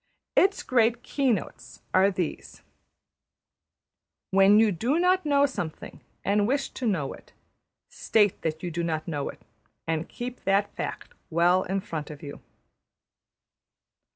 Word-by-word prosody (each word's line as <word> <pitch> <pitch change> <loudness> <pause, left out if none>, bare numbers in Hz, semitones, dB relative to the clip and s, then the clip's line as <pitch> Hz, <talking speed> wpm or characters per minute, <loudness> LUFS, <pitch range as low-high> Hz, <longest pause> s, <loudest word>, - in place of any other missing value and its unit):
Its 395 +2 +3
great 240 -1 +2
keynotes 210 - -2
are 190 +1 +5
these: 180 -4 -5 1.7
When 195 +2 +6
you 220 -1 +4
do 235 - 0
not 360 -1 +2
know 285 -1 +4
something, 175 - -6 0.2
and 205 +1 +2
wish 275 +2 0
to 250 - -3
know 165 -10 -1
it, - - -16 0.5
state 210 -3 +1
that 160 +1 -3
you 175 - -3
do 170 +2 -2
not 160 -1 -2
know 145 -4 -2
it, - - -12 0.4
and 160 0 -2
keep 245 +1 -7
that 200 +1 +2
fact - - -5 0.2
well 175 +2 +3
in 195 +1 -2
front 155 -5 -5
of 150 -1 -10
you. 145 -1 -8
195 Hz, 135 wpm, -26 LUFS, 165-245 Hz, 1.7 s, When